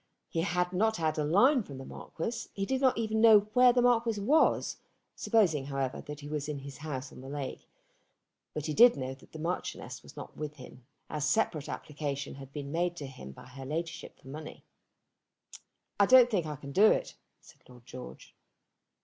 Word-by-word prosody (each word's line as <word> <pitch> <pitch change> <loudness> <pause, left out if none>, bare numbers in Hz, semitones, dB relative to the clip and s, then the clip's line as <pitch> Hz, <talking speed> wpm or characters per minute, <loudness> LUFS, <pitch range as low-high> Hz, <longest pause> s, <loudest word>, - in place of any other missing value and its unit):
He 165 - -1
had 180 0 0
not 220 +4 +2
had 155 -2 0
a - - +1
line 240 - +4
from 140 -10 -9
the 135 - -8
Marquis. 230 - -6
He 195 - -2
did 265 +4 -1
not 260 -1 +3
even 220 -1 0
know 220 -2 +8
where 250 +1 +7
the 245 0 +2
Marquis 230 -3 +2
was, 290 +11 +2 0.4
supposing, 175 - +2
however, 135 -2 -2
that 150 0 -8
he 145 - -8
was 150 0 -3
in 150 - -3
his 140 -2 -8
house 140 -3 -5
on - - -12
the 135 - -9
lake; 140 -2 -6 0.9
but 150 - -3
he 155 - -2
did 235 0 +7
know 130 -1 -3
that 135 - -18
the - - -9
Marchioness 170 +3 -4
was - - -15
not - - -9
with 150 -1 -5
him, 125 -2 -13 0.2
as 150 -1 -1
separate 160 -9 0
application 145 -1 -4
had 135 0 -11
been 140 -1 -6
made 175 +2 0
to 145 - -6
him 130 - -10
by 65 - -13
her 130 +2 -10
Ladyship 165 +4 -5
for - - -18
money. 155 +3 -9 1.3
"I 200 - +6
don't 255 -1 +7
think 180 -7 0
I 150 - -4
can 140 0 -9
do 205 +9 +6
it," - - +1 0.3
said - - -19
Lord 125 -1 -16
George. 125 0 -10
155 Hz, 200 wpm, -30 LUFS, 140-215 Hz, 1.3 s, know